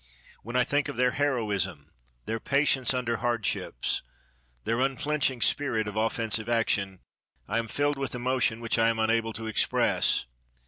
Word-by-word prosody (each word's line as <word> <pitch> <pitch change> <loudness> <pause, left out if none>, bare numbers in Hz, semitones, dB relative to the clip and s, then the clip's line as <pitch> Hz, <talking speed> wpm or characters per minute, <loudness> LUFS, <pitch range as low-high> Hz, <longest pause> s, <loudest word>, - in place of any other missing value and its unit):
When 120 +3 -7
I 125 - +4
think 145 +1 0
of - - -5
their 125 +1 +2
heroism, 105 - -1 0.3
their 115 0 -2
patience 140 0 +2
under 125 -3 -1
hardships, 120 - -1 0.6
their 115 +2 0
unflinching 135 -1 0
spirit 115 -7 +2
of 105 - -5
offensive 110 0 0
action, 100 -5 0 0.5
I 115 +4 0
am 115 - -3
filled 145 +4 0
with 135 -2 -2
emotion 125 -2 0
which 115 0 0
I 115 0 +4
am 115 - 0
unable 115 0 +1
to 110 - -6
express. 110 - +2
115 Hz, 150 wpm, -27 LUFS, 110-130 Hz, 0.6 s, I